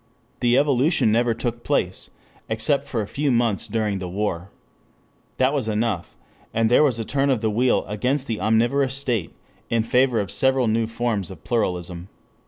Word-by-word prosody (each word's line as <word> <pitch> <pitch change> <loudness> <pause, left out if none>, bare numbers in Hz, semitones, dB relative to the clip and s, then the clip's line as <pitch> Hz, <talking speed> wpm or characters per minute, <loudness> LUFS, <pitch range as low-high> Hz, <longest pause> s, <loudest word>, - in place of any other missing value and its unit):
The 120 +1 +3
evolution 140 -2 +3
never 115 +1 +2
took 120 0 -3
place, - - -1 0.4
except 125 +6 +1
for 115 -4 -2
a - - -7
few 145 +5 -1
months 115 -4 +1
during 105 -3 -1
the 90 -1 -5
war. 95 -1 -3 0.9
That 130 +2 +2
was 135 -6 -1
enough, 110 -4 -2 0.4
and 115 0 +2
there 125 - +6
was 135 -6 +2
a 115 - -4
turn 140 +3 0
of 130 -5 +1
the 110 -1 0
wheel 125 +4 +2
against 125 +7 -1
the 110 -6 -3
omnivorous 120 +6 +2
state 120 - -1 0.4
in 115 -1 +1
favor 125 0 +2
of 100 -3 -3
several 130 -1 +3
new 110 +1 +1
forms 115 -5 -2
of 95 -5 -11
pluralism. 90 -5 -2
115 Hz, 175 wpm, -23 LUFS, 105-130 Hz, 0.9 s, there